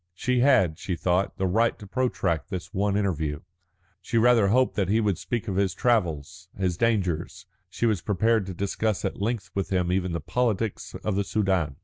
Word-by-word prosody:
She 125 +6 0
had, 100 - +3
she 90 - -3
thought, 90 +3 0
the 95 - 0
right 110 +6 +2
to 105 - -11
protract 100 - -1
this 90 -3 -6
one 100 +1 +1
interview. 80 -8 -1 0.6
She 115 - -2
rather 115 -2 +5
hoped 125 +5 +2
that 95 -3 0
he 110 +3 +3
would 105 -6 0
speak 120 -2 -3
of 95 -2 -2
his 95 -2 +1
travels, 90 - -1
his 95 -3 0
dangers; 95 -4 -1 0.2
she 120 - -2
was 105 -6 +1
prepared 110 +1 +1
to 95 - -6
discuss 100 +2 -1
at - - -3
length 105 -3 -2
with 100 - -2
him 90 -2 0
even 90 -1 0
the 85 - -1
politics 115 +4 -2
of 105 - -1
the 100 - +1
Soudan. 95 -9 0
100 Hz, 195 wpm, -26 LUFS, 90-110 Hz, 0.6 s, rather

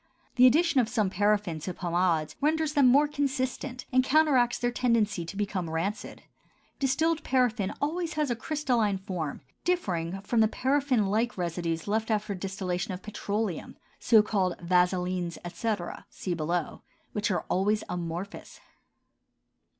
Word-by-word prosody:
The 255 0 +8
addition 315 +2 +4
of 235 -3 +2
some 215 -5 0
paraffin 205 -4 +1
to 180 +3 -5
pomades 170 -3 0
renders 310 +1 +1
them 280 -3 +5
more 285 +4 +5
consistent 265 -3 -2
and 255 0 +5
counteracts 265 -4 +3
their 245 0 0
tendency 225 -7 +1
to 180 +4 -8
become 195 -4 -2
rancid. 185 +8 -3 0.6
Distilled 310 +4 +1
paraffin 245 -7 +1
always 330 +3 -1
has 300 -4 0
a - - +1
crystalline 240 -7 0
form, 180 -6 -5 0.2
differing 190 - -1
from 225 +4 0
the 220 - +6
paraffin 260 -1 +1
like 220 +4 0
residues 170 -1 -2
left 220 +2 0
after 210 -2 0
the 185 - -7
distillation 190 -1 -3
of 180 - -11
petroleum 210 -3 -3 0.2
(so 220 -3 +5
called 190 -4 0
vaselins, 180 0 +1
etc., 180 0 -3
see 180 - -4
below) 170 0 -2 0.3
which 210 +2 0
are 185 - -1
always 205 +3 +1
amorphous. 175 +3 -6
210 Hz, 140 wpm, -28 LUFS, 180-255 Hz, 0.6 s, The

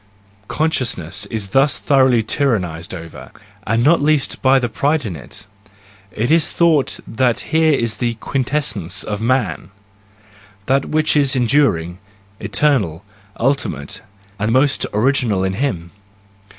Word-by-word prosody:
Consciousness 105 - -1
is 100 -2 -4
thus 135 +5 +3
thoroughly 130 -5 +3
tyrannised 95 - -1
over 85 -3 -9 0.2
— - - -28
and 115 +2 +1
not 160 +4 +4
least 150 -2 0
by 135 0 +4
the 125 -2 0
pride 145 +4 0
in 95 -5 -4
it! 65 -5 -10 0.7
It 115 +6 -2
is 160 -1 +3
thought 160 -5 +2
that 120 0 0
here 160 -1 +4
is 115 -5 -1
the 120 0 -1
quintessence 110 - -2
of 105 0 -4
man; 115 -9 -1 1.0
that 135 +1 +1
which 155 0 0
is 140 -3 +3
enduring, 115 - +1 0.4
eternal, 105 - 0 0.3
ultimate, 115 - -2 0.4
and 105 +2 0
most 135 +3 +2
original 110 -3 +1
in 95 0 -1
him! 95 -8 -3
120 Hz, 130 wpm, -18 LUFS, 100-140 Hz, 1.0 s, not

